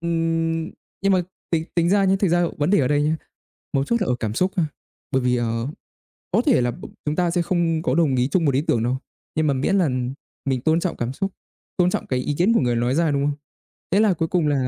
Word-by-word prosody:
ừm, 165 -1 0 0.3
nhưng 195 0 +3
mà 185 -1 +3 0.3
tính 160 -2 +1
tính 170 -1 +2
ra 200 +1 +4
nhá, 190 0 +3
thực 195 - +3
ra 175 +1 +3
vấn 150 +3 +1
đề 205 - +5
ở 130 - +1
đây 145 0 +2
nhá, 155 +2 +1 0.6
mấu 135 -1 +2
chốt 235 +9 0
là 195 - 0
ở 125 - +2
cảm 110 -1 -2
xúc 185 +10 +1
ha. 170 - +3 0.5
Bởi 130 - +2
vì, 125 0 +2
ờ, 115 0 -1 0.6
có - - +3
thể - - +4
là 120 0 +1
b - - -10 0.2
chúng 150 0 0
ta 175 -1 +1
sẽ 175 0 +1
không 170 -2 +1
có 130 - +1
đồng 155 -5 +3
ý 125 0 +2
chung 170 +3 +1
một 140 - +3
ý 135 - +2
tưởng 120 -7 +1
đâu, 125 +2 0 0.4
nhưng 155 0 +2
mà 140 - +3
miễn 135 +9 +1
là 175 -6 +3 0.6
mình 130 -2 0
tôn 160 +4 +3
trọng 180 0 -2
cảm 120 +2 -2
xúc, 195 +7 -2 0.5
tôn 180 -1 +4
trọng - - -3
cái 130 - 0
ý 145 +3 -2
kiến 190 +7 +4
của - - +3
người 120 -2 +1
nói 120 +3 +1
ra, 165 -1 +2
đúng 140 0 +1
không? 145 0 0 0.6
Thế 195 - +4
là 215 -3 +4
cuối 165 -1 -1
cùng 170 -2 +1
là, 135 -3 +1
160 Hz, 265 wpm, -23 LUFS, 130-175 Hz, 0.6 s, đề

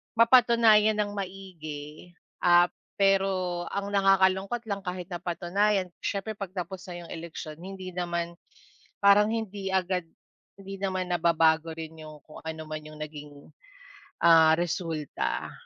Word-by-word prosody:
mapatunayan 230 -2 +5
ng 205 - -6
maigi. 175 -5 -8 0.2
Ah, 175 0 +5 0.2
pero 190 -3 +1
ang 200 0 -3
nakakalungkot 195 +3 +3
lang 200 - -1
kahit 180 0 -5
napatunayan 180 +3 0
siyempre 200 +2 -3
'pag 195 -2 -6
tapos 180 +1 -5
na 175 -1 -7
'yong - - -12
eleksiyon 160 -2 -7
hindi 185 +1 -8
naman 170 -1 -3 0.6
parang 200 +1 +6
hindi 205 -3 -4
agad 185 -2 0 0.5
hindi 195 0 -8
naman 185 -2 -2
nababago 165 -1 +2
rin 160 0 -8
'yong 155 -1 -10
kung 155 - -12
ano 160 0 -5
man 155 0 -5
'yong 155 0 -12
naging, 150 -1 -11 0.7
ah, 160 -2 +7
resulta. 165 -4 -3
180 Hz, 125 wpm, -27 LUFS, 165-195 Hz, 0.7 s, ah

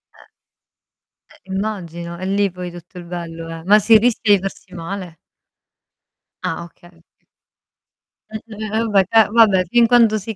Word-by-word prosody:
Eh. - - -21 1.1
Eh, 190 - -12
immagino, 175 -4 -5
e 185 - -5
lì 200 0 0
poi 180 0 -7
tutto 175 +1 -13
il 175 - -9
bello 165 -1 -7
è, 165 0 -8
ma 205 +4 +5
si 220 +2 +6
rischia 220 -2 +2
di - - -1
farsi 195 0 -8
male? 175 0 -7 1.3
Ah, 165 +1 -3
okay, 175 +1 -18
ok 170 -1 -27 1.1
Mh, 215 - -5 0.2
ve 215 0 -5
vabbè, 210 -4 +2
ca 225 +1 +4
vabbè, 205 -5 +4
fin 235 +5 +3
quando 230 -3 +4
si 220 +2 -7
190 Hz, 155 wpm, -19 LUFS, 170-215 Hz, 1.3 s, si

